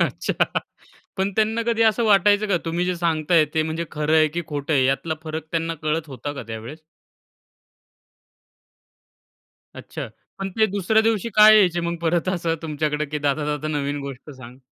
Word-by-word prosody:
अच्छा. - - 0 0.7
पण 190 0 0
त्यांना 220 +1 +1
कधी 230 -1 +2
असं 220 +1 +3
वाटायचं 205 0 +4
का? 190 - +2
तुम्ही 170 +2 -1
जे 180 -1 -1
सांगताय 165 -1 +2
ते 160 - +2
म्हणजे 160 +2 -3
खरं 150 +1 +1
आहे 155 -1 +5
की 170 +3 -4
खोटं 145 +1 -3
आहे? 135 -3 +3
यातला 145 +4 -1
फरक 160 -1 -5
त्यांना 165 0 -1
कळत 155 +1 -1
होता 145 +2 -6
का 140 -3 -7
त्यावेळेस? 115 +8 -7 2.9
अच्छा. - - -7 0.3
पण 195 - -3
ते 220 +3 +2
दुसऱ्या 205 +2 +1
दिवशी 225 -1 0
का 215 0 +8
यायचे 185 -5 +5
मग 170 0 -2
परत 170 +2 0
असं 170 -3 0
तुमच्याकडे 150 -1 -2
की 150 +1 -4
दादा, 145 +1 0
दादा 150 0 -3
नवीन 145 -1 -2
गोष्ट 140 +1 -8
सांग? 130 -2 -12
165 Hz, 165 wpm, -22 LUFS, 150-190 Hz, 2.9 s, का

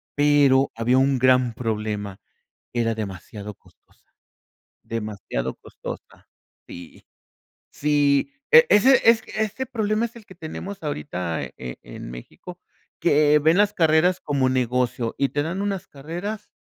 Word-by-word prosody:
pero 145 -2 +4
había 120 +3 +2
un 135 0 +2
gran 125 -1 +3
problema, 105 -4 -4 0.5
era 115 -1 0
demasiado 105 0 -7
costosa, - - -28 0.7
demasiado 105 - -4
costosa, - - -10 0.4
sí. 85 -1 -11 0.7
Sí, 145 - +1 0.2
e 475 0 +9
ese 260 +6 +6
es 230 -1 +6
ese 220 +5 -3
problema 220 -2 -1
es 235 - -15
el 225 - -12
que 190 - -14
tenemos 185 +4 -7
ahorita, 90 - -3
eh, - - -7
en 60 -1 -7
en - - -9
México, 175 - -11 0.4
que 150 -2 +4
ven 160 +3 +3
las 205 0 +3
carreras 165 +2 +3
como 140 -3 0
negocio 125 -2 0
y 140 -1 +1
te 145 - -1
dan 175 +6 -3
unas 200 -2 -3
carreras 175 +10 -6
140 Hz, 135 wpm, -23 LUFS, 115-180 Hz, 0.7 s, e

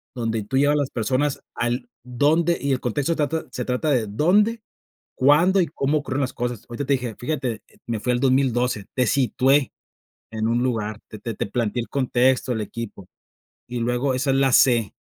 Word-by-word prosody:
donde 115 -3 -2
tú 130 +6 -2
llevas 145 +2 +4
las 140 -2 -1
personas 130 +5 -1
al 120 - -2
dónde, 150 +7 +2
y 140 0 0
el 125 - 0
contexto 145 +7 -1
trata 155 +2 -1
se 125 - -4
trata 125 +5 -1
de 125 -5 +2
dónde, 205 - +2 0.5
cuándo 165 +8 +4
y 175 - +2
cómo 150 0 0
ocurrieron 140 -1 -2
las 130 - -2
cosas. 120 -2 -3
Ahorita 130 +4 -4
te 140 - +3
dije 125 -4 -3
fíjate, 130 -4 -3 0.2
me 115 -2 -3
fui 125 +3 0
al 120 - 0
2012, 125 -5 +1
te 125 -2 +2
situé 135 +1 +2 0.6
en 110 0 -2
un 120 +1 +1
lugar, 110 -4 -2
te 110 - -9
te 115 +2 -5
te - - -2
planteé 115 +2 -1
el - - -7
contexto, 130 -1 +1
el 110 - -2
equipo. 105 -3 -7 0.6
Y 120 -1 -4
luego 125 +3 0
esa 135 +2 0
es 135 - +2
la 135 -1 +3
C. 120 -6 +4
125 Hz, 190 wpm, -23 LUFS, 120-140 Hz, 0.6 s, llevas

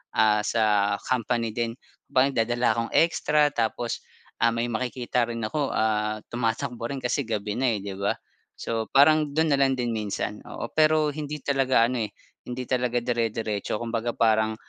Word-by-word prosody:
ah, 105 -1 +4
sa 105 -3 +2
company 120 -2 0
din 115 -1 -1 0.4
ba 130 -1 +5
nagdadala 120 -1 +1
akong 115 0 -2
extra 150 -2 +3
tapos, 115 0 -2 0.4
ah, - - +6
may 115 +1 0
makikita 125 0 -1
rin 115 -1 -4
ako, 140 +5 -1
ah, 110 0 0
tumatakbo 120 +1 -2
rin 140 -1 -4
kasi 130 +3 0
gabi 105 -2 -2
na, 130 - +2
eh, 105 - -3
'di 100 -1 -5
ba. 100 - +1 0.5
So, 115 -1 -3
parang 150 +1 +4
dun 160 -2 +3
na 140 - +2
lang 135 -1 +3
din 120 -1 -1
minsan 105 0 -3
oo, - - -5
pero 155 -1 +3
hindi 150 0 -6
talaga 135 -4 +3
ano, 125 0 -1
eh, - - -18 0.4
hindi 125 +1 -4
talaga 125 -1 0
dire-diretso 115 -4 -1
kumbaga 115 +1 -3
parang, 110 -1 +2
120 Hz, 170 wpm, -26 LUFS, 110-135 Hz, 0.5 s, ah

